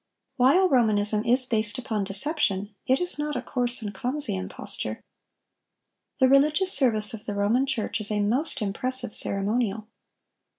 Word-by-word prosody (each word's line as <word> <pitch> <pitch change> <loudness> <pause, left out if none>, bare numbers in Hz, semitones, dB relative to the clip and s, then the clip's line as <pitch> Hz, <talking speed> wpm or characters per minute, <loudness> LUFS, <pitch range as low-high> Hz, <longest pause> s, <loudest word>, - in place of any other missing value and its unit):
While 280 +10 +3
Romanism 215 - +1
is 250 +2 +2
based 220 -1 -2
upon 225 -6 -4
deception, 205 - -1
it 260 +1 +2
is 355 -4 -2
not 295 0 -3
a 250 - -3
coarse 245 -2 0
and 205 -1 -6
clumsy 245 +1 -3
imposture. 185 0 -4 1.2
The 260 - +3
religious 300 +8 +3
service 220 -6 +4
of 225 0 -9
the 205 - -4
Roman 220 +7 0
Church 235 -4 -3
is 205 - +4
a 210 -1 -2
most 245 +5 -1
impressive 250 +4 +1
ceremonial. 210 +1 +1
240 Hz, 145 wpm, -24 LUFS, 210-265 Hz, 1.2 s, service